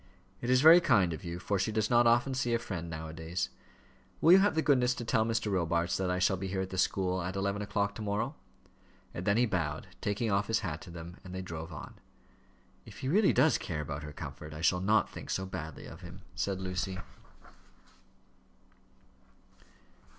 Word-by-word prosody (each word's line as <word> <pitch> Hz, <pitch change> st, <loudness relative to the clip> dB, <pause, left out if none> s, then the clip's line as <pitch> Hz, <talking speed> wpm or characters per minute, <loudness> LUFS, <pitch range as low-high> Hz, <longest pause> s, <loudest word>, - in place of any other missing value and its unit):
"It 120 Hz, -, -3 dB
is 130 Hz, 0 st, +5 dB
very 165 Hz, +4 st, +9 dB
kind 95 Hz, -, +3 dB
of 80 Hz, -, -7 dB
you, 85 Hz, -1 st, -5 dB
for 100 Hz, +2 st, -1 dB
she 110 Hz, -, 0 dB
does 110 Hz, +1 st, 0 dB
not 120 Hz, 0 st, +5 dB
often 120 Hz, +3 st, +3 dB
see 120 Hz, -2 st, 0 dB
a -, -, +3 dB
friend, 90 Hz, -8 st, -5 dB
now 80 Hz, 0 st, -5 dB
a 80 Hz, -, -8 dB
days. 80 Hz, +3 st, -3 dB, 0.7 s
Will 165 Hz, -, +5 dB
you 185 Hz, -, +10 dB
have 200 Hz, -3 st, +3 dB
the 160 Hz, -, +2 dB
goodness 125 Hz, -3 st, +3 dB
to 120 Hz, -, -5 dB
tell 115 Hz, -1 st, +2 dB
Mr. 115 Hz, -1 st, -1 dB
Robarts 85 Hz, 0 st, +1 dB
that 95 Hz, -1 st, -1 dB
I 90 Hz, -, 0 dB
shall 90 Hz, +1 st, +2 dB
be 95 Hz, +1 st, -4 dB
here 95 Hz, 0 st, -2 dB
at 95 Hz, -, -5 dB
the 95 Hz, -, -4 dB
school, 95 Hz, -1 st, +1 dB
at 90 Hz, +2 st, -4 dB
eleven 100 Hz, +1 st, -1 dB
o'clock 100 Hz, 0 st, -1 dB
to 110 Hz, -, -8 dB
morrow?" 100 Hz, -1 st, -1 dB, 0.8 s
And 90 Hz, -, -5 dB
then 100 Hz, +1 st, +3 dB
he 120 Hz, -, +4 dB
bowed, 80 Hz, -8 st, -2 dB
taking 105 Hz, +2 st, -1 dB
off 100 Hz, +1 st, +1 dB
his 115 Hz, 0 st, +1 dB
hat 80 Hz, -7 st, -4 dB
to 95 Hz, -, -11 dB
them, 85 Hz, +1 st, -9 dB
and 95 Hz, -1 st, -8 dB
they 95 Hz, -, -4 dB
drove 80 Hz, -3 st, -7 dB
on. -, -, -9 dB, 0.8 s
"If -, -, -12 dB
he 130 Hz, -, -2 dB
really 200 Hz, +5 st, +4 dB
does 145 Hz, +5 st, +4 dB
care 80 Hz, -3 st, -3 dB
about 70 Hz, 0 st, -5 dB
her 75 Hz, 0 st, -7 dB
comfort, 75 Hz, +1 st, -8 dB
I 75 Hz, -, -7 dB
shall 90 Hz, +2 st, +2 dB
not 105 Hz, +1 st, +3 dB
think -, -, -10 dB
so 95 Hz, -, -1 dB
badly 80 Hz, -5 st, -7 dB
of 80 Hz, -, -11 dB
him," 90 Hz, +1 st, -10 dB
said 95 Hz, -1 st, -2 dB
Lucy. 95 Hz, 0 st, -3 dB
95 Hz, 210 wpm, -31 LUFS, 85-115 Hz, 0.8 s, you